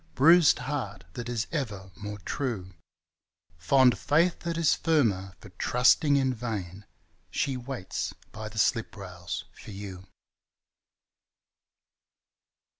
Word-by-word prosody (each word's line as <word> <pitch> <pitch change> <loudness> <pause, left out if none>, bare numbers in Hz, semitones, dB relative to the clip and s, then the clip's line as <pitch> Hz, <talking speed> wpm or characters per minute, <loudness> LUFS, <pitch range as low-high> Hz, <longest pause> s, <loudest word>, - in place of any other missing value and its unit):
Bruised 165 +2 +6
heart 125 -7 -4
that 120 0 -5
is 120 -1 -1
ever 105 - -4
more 105 -1 -6
true, 100 - -4 0.9
Fond 130 +7 +5
faith 165 +4 +2
that 170 -1 -3
is 165 -2 +4
firmer 105 - +1
for 105 - -13
trusting 125 - +3
in 135 -2 +2
vain 105 -5 -5 0.2
— - - -40
She 135 - -1
waits 125 -5 -4 0.2
by 110 0 -6
the 110 - -12
slip 110 0 +1
rails 90 -3 -6
for - - -13
you. 95 -2 -8
115 Hz, 115 wpm, -28 LUFS, 100-140 Hz, 0.9 s, Bruised